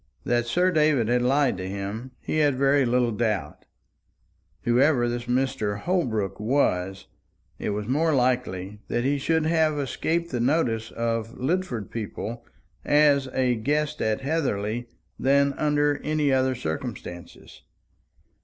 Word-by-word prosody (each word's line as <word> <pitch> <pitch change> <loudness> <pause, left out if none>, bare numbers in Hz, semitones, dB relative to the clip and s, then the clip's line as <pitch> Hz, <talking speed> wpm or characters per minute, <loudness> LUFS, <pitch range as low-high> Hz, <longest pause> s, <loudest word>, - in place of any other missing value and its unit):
That 120 -1 0
Sir 180 +9 +2
David 150 -8 +2
had 125 0 +2
lied 135 +1 +2
to 95 0 -5
him, 100 +6 -5
he 155 - -2
had 145 -3 +3
very 140 0 +3
little 120 0 +2
doubt. 105 -9 -2 1.0
Whoever 125 +1 +3
this 120 0 -3
Mr. 125 -5 -1
Holbrook 125 - -1
was, 95 -6 0 0.5
it - - -2
was 105 0 -3
more 155 +6 +2
likely 120 -6 -1
that 120 - -1
he 140 +2 +1
should 160 +3 +1
have 160 -2 +2
escaped 165 +5 -1
the 125 - -1
notice 120 -4 +1
of 115 0 -3
Lidford 130 - -2
people 115 +1 -5 0.4
as 145 -2 +4
a 130 -1 +1
guest 150 +6 -1
at 110 +4 0
Heatherly 120 -6 -1 0.3
than 140 +1 +3
under 145 -1 +1
any 150 -2 +1
other 130 0 +2
circumstances. 85 -1 -7
125 Hz, 135 wpm, -25 LUFS, 115-145 Hz, 1.0 s, as